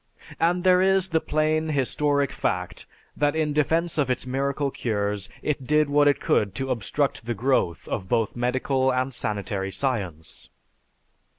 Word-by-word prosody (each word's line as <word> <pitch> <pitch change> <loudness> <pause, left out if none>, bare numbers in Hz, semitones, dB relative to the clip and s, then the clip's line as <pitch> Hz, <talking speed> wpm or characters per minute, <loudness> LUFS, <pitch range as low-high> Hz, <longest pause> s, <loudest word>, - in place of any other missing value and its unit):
And 175 +2 +2
there 185 -1 +5
is 190 0 +3
the 160 -2 +1
plain, 155 +1 0
historic 145 0 +1
fact, 90 0 -3 0.3
that 145 +1 +1
in 155 -2 0
defense 160 +2 +1
of 140 -3 +1
its 125 0 -1
miracle 140 +2 -1
cures 105 -4 -2
it 135 -4 -2
did 150 -1 +2
what 145 0 +4
it 145 - +3
could 100 -2 +1
to 135 0 -2
obstruct 125 +2 -1
the 120 - -1
growth 115 - 0
of 95 - -4
both 115 -2 0
medical 130 +2 +1
and 130 +1 -1
sanitary 100 -3 -3
science. 95 - -4
135 Hz, 155 wpm, -25 LUFS, 115-150 Hz, 0.3 s, there